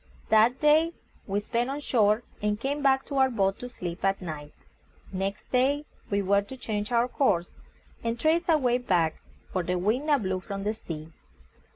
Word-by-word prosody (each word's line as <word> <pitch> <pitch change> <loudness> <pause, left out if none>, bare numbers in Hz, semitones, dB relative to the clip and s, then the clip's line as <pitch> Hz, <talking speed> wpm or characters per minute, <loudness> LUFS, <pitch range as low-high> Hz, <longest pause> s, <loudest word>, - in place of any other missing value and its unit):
That 225 +4 +4
day 310 +3 +4 0.3
we 200 0 0
spent 235 +4 -1
on 280 +2 -3
shore, 220 -5 +2 0.2
and 210 0 0
came 280 +4 -2
back 270 -1 +3
to 280 - -4
our 265 0 +5
boat 195 -5 0
to 245 - -6
sleep 180 -7 -6
at 195 0 +2
night. 155 -4 -7 0.6
Next 195 +1 -3
day 275 +4 +2 0.2
we 200 0 +1
were 200 +1 +3
to 235 +6 -10
change 210 -2 -3
our 240 0 +3
course, 205 -10 +1 0.5
and 230 0 -2
trace 335 +5 +2
our 320 - +6
way 250 -3 +2
back, 175 -9 +1 0.3
for 185 - +1
the 180 +1 -1
wind 220 - 0
now 295 -2 +5
blew 190 -6 -1
from 195 +1 -6
the 210 +1 0
sea. 160 -7 -8
220 Hz, 190 wpm, -27 LUFS, 195-265 Hz, 0.6 s, our